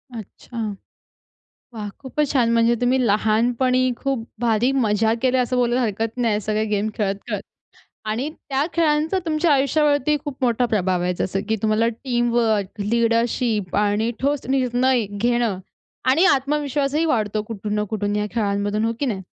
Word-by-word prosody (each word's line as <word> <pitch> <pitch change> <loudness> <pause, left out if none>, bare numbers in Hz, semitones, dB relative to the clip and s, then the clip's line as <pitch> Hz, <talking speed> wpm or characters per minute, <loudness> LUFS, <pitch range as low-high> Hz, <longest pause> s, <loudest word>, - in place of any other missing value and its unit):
अच्छा. 225 +2 -10 1.2
वाह! 210 -2 -5
खूपच 285 +2 -2
छान. 245 -4 +2
म्हणजे 230 0 +3
तुम्ही 250 +1 +2
लहानपणी 235 +5 +2
खूप 265 -3 -2
भारी 235 +1 +2
मजा 220 +1 +2
केल्या, 255 -1 +3
असं 250 +1 -2
बोलायला 245 0 +2
हरकत 225 +1 -2
नाही 225 -4 +1
सगळे 215 +1 -1
गेम 210 0 0
खेळत-खेळत. 200 -2 -2 0.6
आणि 220 +6 -2 0.2
त्या 275 0 +1
खेळांचा 320 +2 +2
तुमच्या 315 0 +2
आयुष्यावरती 290 +1 +2
खूप 290 -3 -5
मोठा 245 0 +2
प्रभाव 185 -5 0
आहे. 180 0 0
जसं 190 +2 -2
की 220 - +1
तुम्हाला 220 +1 +2
टीमवर्क, 235 -4 0
लीडरशिप 230 -2 0
आणि 210 +2 +1
ठोस 285 +1 0
निर्णय 255 -2 +2
घेणं 230 -1 0 0.5
आणि 320 +8 +4
आत्मविश्वासही 285 +1 +1
वाढतो 215 -8 0
कुठून 210 -1 -5
ना 210 - +1
कुठून 205 -1 -1
या 210 0 0
खेळांमधून, 205 -1 0
हो 225 - +1
की 285 - 0
नाही? 200 -6 -2
235 Hz, 145 wpm, -22 LUFS, 210-260 Hz, 1.2 s, आणि